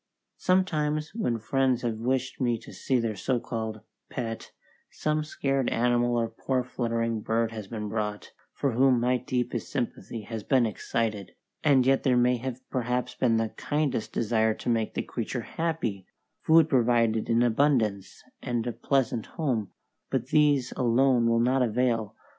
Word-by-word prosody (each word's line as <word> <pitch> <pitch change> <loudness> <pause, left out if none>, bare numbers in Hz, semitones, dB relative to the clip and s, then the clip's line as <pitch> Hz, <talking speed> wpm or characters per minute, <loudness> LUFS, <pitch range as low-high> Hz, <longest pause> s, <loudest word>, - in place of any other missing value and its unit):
Sometimes 155 -5 +1
when 210 - -1
friends 125 +2 +1
have 115 -2 -2
wished 130 +3 -1
me 120 -2 +2
to - - -13
see 130 -2 0
their 115 -2 -1
so 125 +5 0
called 110 -2 -4 0.3
"pet," 115 -3 -5 0.4
some 155 0 -1
scared 135 -3 -1
animal 120 0 +2
or 115 -1 +1
poor 130 +2 -2
fluttering 115 -2 -2
bird 115 +1 0
has 110 -3 -7
been 105 0 -5
brought, 105 -1 -3 0.2
for 140 - -1
whom 130 +1 +4
my 125 +1 +2
deepest 125 -2 -3
sympathy 115 -1 -3
has 110 +1 -6
been 125 +3 +3
excited; 110 -2 -2 0.3
and 135 -4 +4
yet 135 0 +3
there 125 -2 +3
may 125 0 +3
have 130 +1 -4
been 130 - -28
perhaps 125 0 -1
the 115 -3 +1
kindest 145 -7 -1
desire 110 -1 +1
to - - -5
make 115 -2 0
the - - -1
creature - - -4
happy, 155 - -3 0.3
food 160 0 +5
provided 115 -3 +2
in 115 +1 +3
abundance, 115 -6 +1 0.2
and 120 -2 -2
a 120 - -1
pleasant 120 -2 0
home; 125 - 0 0.4
but 130 -1 -2
these 145 -4 +3
alone 125 0 +3
will 115 0 +3
not 130 +3 +2
avail. 115 -2 0
120 Hz, 160 wpm, -27 LUFS, 115-130 Hz, 0.4 s, food